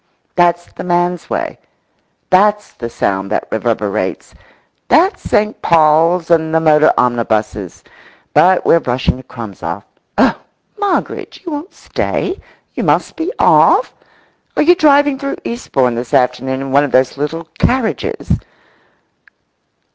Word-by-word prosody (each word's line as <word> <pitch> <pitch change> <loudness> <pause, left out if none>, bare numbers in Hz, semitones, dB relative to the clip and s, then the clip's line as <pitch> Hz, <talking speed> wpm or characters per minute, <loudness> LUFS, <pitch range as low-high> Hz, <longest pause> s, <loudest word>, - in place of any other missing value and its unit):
That's 175 -1 +2
the - - -7
man's 175 -1 -1
way; - - -3 0.7
that's 210 +2 +3
the 115 - -6
sound 95 -4 -2
that - - -1
reverberates; 110 -2 -2 0.5
that's 370 +4 +3
St. 210 +1 0
Paul's 165 +2 +3
and 160 -1 +2
the - - +5
motor 155 -1 +4
omnibuses. 110 -6 -1 0.5
But 185 +1 +4
we're 170 - +5
brushing 125 -3 -1
the - - -10
crumbs 115 -6 -10
off. 85 +4 -5 0.3
Oh, - - +3 0.4
Moggridge, 405 -1 -3
you 340 - -5
won't 300 +6 -6
stay? 375 - -3 0.3
You - - -3
must - - +1
be 330 +4 -3
off? - - +4 0.6
Are - - +4
you 345 +4 +6
driving 290 -5 +3
through 275 -1 -4
Eastbourne 135 - -1
this 120 0 -3
afternoon 130 +1 0
in 135 -1 -5
one 140 +2 +4
of 145 - -3
those 130 0 +2
little 165 +3 -3 0.2
carriages? 250 -3 0
160 Hz, 130 wpm, -15 LUFS, -, 0.7 s, you